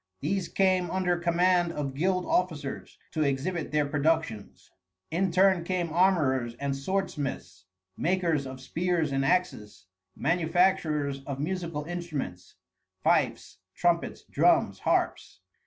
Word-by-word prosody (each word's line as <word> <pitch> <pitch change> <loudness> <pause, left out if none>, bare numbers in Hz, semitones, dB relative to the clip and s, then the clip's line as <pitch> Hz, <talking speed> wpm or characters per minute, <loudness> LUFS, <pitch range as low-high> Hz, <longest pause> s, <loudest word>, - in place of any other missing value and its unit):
These 180 +4 -1
came 185 -2 +2
under 185 -1 +1
command 175 0 +2
of 140 -3 -3
guild 180 +5 0
officers, 155 -6 -2
to 155 - -2
exhibit 150 +4 -1
their 150 -1 +2
productions. 145 -6 -1 0.4
In 180 +2 +1
turn 185 -1 +4
came 175 -2 -2
armorers 140 -10 +2
and 140 +2 -2
swordsmiths, 135 - -3 0.3
makers 170 -6 0
of 130 0 -8
spears 165 +3 -1
and 135 0 0
axes, 120 - -1 0.3
manufacturers 160 -4 +1
of 140 -1 -4
musical 165 -1 -3
instruments, 155 - -5 0.5
fifes, - - +1 0.2
trumpets, 175 -1 0
drums, - - +2
harps. - - -1
165 Hz, 115 wpm, -28 LUFS, 140-180 Hz, 0.5 s, turn